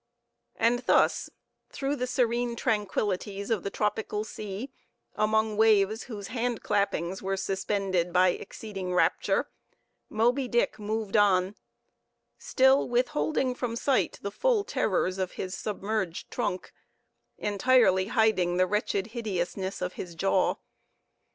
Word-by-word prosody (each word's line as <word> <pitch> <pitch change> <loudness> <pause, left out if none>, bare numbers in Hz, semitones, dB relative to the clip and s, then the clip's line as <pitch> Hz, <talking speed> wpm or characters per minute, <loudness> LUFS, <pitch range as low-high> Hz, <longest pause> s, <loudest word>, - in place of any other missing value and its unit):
And 235 +1 +2
thus, - - +3 0.4
through 280 +1 -2
the 250 -2 -2
serene 240 -1 0
tranquillities 205 -2 -1
of 220 -5 +1
the 200 - -3
tropical 210 0 -2
sea, 215 +4 -6 0.4
among 215 0 +1
waves 220 -1 +3
whose 205 -5 -7
hand 240 -1 -2
clappings 190 -2 0
were 195 0 -2
suspended 190 -2 -1
by 180 +1 +5
exceeding 190 -1 -5
rapture, - - +2 0.6
Moby 245 +5 +1
Dick 240 -2 0
moved 215 -1 -3
on, 195 -2 +4 0.9
still 265 +1 +3
withholding 255 +1 +1
from 245 -2 -3
sight 265 +2 +1
the 200 - -3
full 480 - +1
terrors 190 - 0
of 185 -1 -2
his 185 0 -4
submerged 200 -4 -3
trunk, 210 -6 -3 0.6
entirely 205 -3 +3
hiding 205 -6 +2
the 185 - +4
wretched 200 0 -1
hideousness 190 -4 -3
of 180 0 -3
his 175 -2 -7
jaw. 190 +2 +2
210 Hz, 120 wpm, -28 LUFS, 190-235 Hz, 0.9 s, by